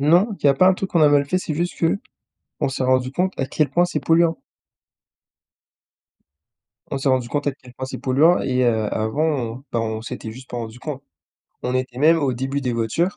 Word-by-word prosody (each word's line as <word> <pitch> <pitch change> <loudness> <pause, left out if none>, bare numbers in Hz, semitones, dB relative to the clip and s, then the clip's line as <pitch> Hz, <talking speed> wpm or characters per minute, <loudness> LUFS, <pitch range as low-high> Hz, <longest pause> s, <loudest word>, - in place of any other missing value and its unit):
Non, 175 +9 +3
il - - -22
y 140 - +7
a - - +5
pas 185 +7 +5
un 190 - +4
truc 195 +1 -4
qu'on 170 - +2
a 150 - +7
mal 145 -1 +4
fait, 180 +6 0
c'est 160 -4 -4
juste 175 +3 -3 0.8
qu'on - - +1
s'est 135 0 -3
rendu 130 0 +2
compte 185 +6 0
à 135 - +1
quel 150 +2 0
point 175 +1 +3
c'est 175 - -2
polluant 165 0 +2 2.5
on 135 - -2
s'est 135 - 0
rendu 130 -2 +1
compte 145 +3 -2
à 145 - +2
quel 130 -2 -17
point 130 - -5
c'est - - -6
polluant 150 +7 +3
et 130 -1 +1
heu, 110 -3 +1
avant, 110 +7 -1
on 130 -5 -2
bah 115 - +1
on 110 -1 -3
s'était 115 -1 -6
juste 130 +3 -12
pas 120 - -5
rendu 115 0 -6
compte. 140 -1 -6 0.6
On 125 - -2
était 130 -1 -2
même 160 +3 +5
au 140 -4 0
début 135 +3 -2
des 125 -3 -1
voitures 115 - 0
135 Hz, 225 wpm, -22 LUFS, 125-160 Hz, 2.5 s, y